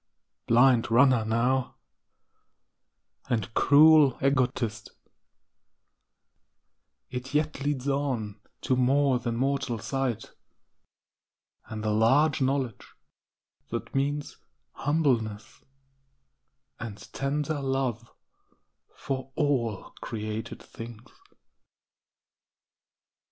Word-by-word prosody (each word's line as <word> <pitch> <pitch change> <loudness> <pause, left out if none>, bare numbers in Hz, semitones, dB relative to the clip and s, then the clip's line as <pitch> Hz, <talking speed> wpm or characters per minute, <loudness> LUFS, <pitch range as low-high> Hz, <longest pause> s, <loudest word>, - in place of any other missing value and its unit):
Blind 120 0 +4
runner 125 0 +5
now, 120 +4 0 1.5
and 110 -2 -1
cruel 150 -1 +6
egotist 125 -5 0 2.2
It 130 +3 -6
yet 150 -2 0
leads 145 -2 -2
on 130 -7 -2 0.2
to 130 - +1
more 130 +1 +2
than 120 -1 -3
mortal 135 -1 -1
sight, 125 0 -3 1.3
And 110 -1 -7
the 110 - 0
large 135 +8 +3
knowledge 130 -4 -2 0.7
that - - -5
means 145 +2 -2 0.3
humbleness, 125 -9 -1 1.2
And 110 -3 -6 0.2
tender 145 +2 -2
love 130 -4 -2 0.9
for 135 -1 -5
all 130 -9 -1
created 110 0 -5
things. 115 -1 -11
130 Hz, 75 wpm, -27 LUFS, 115-140 Hz, 2.2 s, cruel